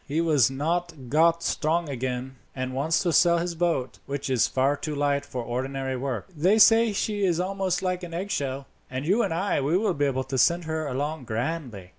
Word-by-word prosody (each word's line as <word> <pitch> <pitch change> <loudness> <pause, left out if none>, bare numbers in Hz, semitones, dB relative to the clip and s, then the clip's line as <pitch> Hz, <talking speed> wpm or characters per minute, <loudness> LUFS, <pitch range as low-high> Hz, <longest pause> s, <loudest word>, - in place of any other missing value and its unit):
He 145 - -3
has 155 -7 +3
not 160 -1 -3
got 165 +3 +3
strong 165 +2 0
again, 130 -1 -4 0.2
and 130 -1 -3
wants 150 +7 +1
to 175 -3 +1
sell 170 0 +5
his 170 +1 -2
boat, 165 -7 -1
which 140 -1 -3
is 125 -4 +3
far 135 +2 +1
too 150 +1 -5
light 140 0 +1
for 125 -3 -4
ordinary 130 +2 -3
work. 130 -2 -3
They 180 +8 +3
say 225 +1 +6
she 205 0 -1
is 175 -3 +2
almost 190 0 -1
like 180 -1 -1
an 175 -1 -7
eggshell, 140 -7 -3 0.2
and 130 +2 -4
you 200 +8 +3
and 200 - 0
I 185 +5 0
will 180 +9 +1
be 145 -2 0
able 130 -1 0
to 130 0 -3
send 170 +5 +3
her 160 -1 -3
along 145 +2 -3
grandly. 115 - -4
150 Hz, 200 wpm, -26 LUFS, 130-175 Hz, 0.2 s, say